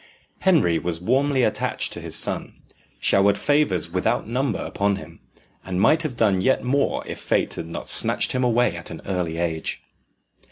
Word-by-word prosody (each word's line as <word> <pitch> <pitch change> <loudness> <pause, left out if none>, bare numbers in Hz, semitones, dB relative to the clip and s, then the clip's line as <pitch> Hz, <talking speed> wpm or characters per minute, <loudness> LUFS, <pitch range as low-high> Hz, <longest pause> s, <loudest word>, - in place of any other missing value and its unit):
Henry 150 - +3
was 85 -2 -2
warmly 130 +7 +1
attached - - -1
to - - -7
his - - -2
son, - - +2 0.4
showered 100 +1 +3
favours 140 - 0
without 90 +3 -1
number 125 +1 -1
upon 100 0 -1
him, 85 -3 -11 0.4
and 95 -1 -3
might 155 +10 +4
have 150 -7 -4
done 100 -5 +2
yet 130 - +1
more 140 +3 0
if - - -7
fate - - 0
had 80 - -6
not 85 - -7
snatched - - +4
him 130 - -1
away 120 -5 +2
at 85 - -8
an 85 - -8
early 90 -4 -2
age. 85 -2 -3
100 Hz, 170 wpm, -23 LUFS, 85-130 Hz, 0.4 s, might